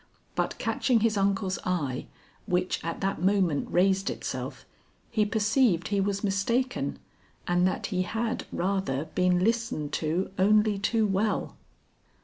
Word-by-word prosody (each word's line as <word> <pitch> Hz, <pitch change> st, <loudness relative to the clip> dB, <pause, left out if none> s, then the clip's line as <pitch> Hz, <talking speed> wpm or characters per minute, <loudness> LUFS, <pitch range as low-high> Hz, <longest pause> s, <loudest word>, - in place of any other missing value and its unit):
But -, -, -1 dB
catching 240 Hz, -4 st, +1 dB
his 225 Hz, -1 st, +2 dB
uncle's 195 Hz, -2 st, 0 dB
eye 150 Hz, -9 st, -2 dB, 0.4 s
which 180 Hz, 0 st, 0 dB
at 165 Hz, 0 st, -4 dB
that 195 Hz, -4 st, -1 dB
moment 185 Hz, -6 st, +2 dB
raised 195 Hz, +2 st, +2 dB
itself, -, -, -5 dB, 0.5 s
he 210 Hz, -1 st, +2 dB
perceived 210 Hz, -3 st, +2 dB
he 200 Hz, -1 st, +1 dB
was 200 Hz, +1 st, -1 dB
mistaken 230 Hz, +6 st, 0 dB, 0.5 s
and 175 Hz, +1 st, +3 dB
that 185 Hz, -, -2 dB
he 185 Hz, -, +1 dB
had 225 Hz, +6 st, -2 dB
rather 185 Hz, -7 st, -1 dB
been 180 Hz, -1 st, +3 dB
listened 230 Hz, -9 st, 0 dB
to 170 Hz, +5 st, -1 dB
only 210 Hz, +1 st, +4 dB
too 220 Hz, +2 st, +2 dB
well. 205 Hz, +2 st, 0 dB
195 Hz, 130 wpm, -28 LUFS, 180-215 Hz, 0.5 s, only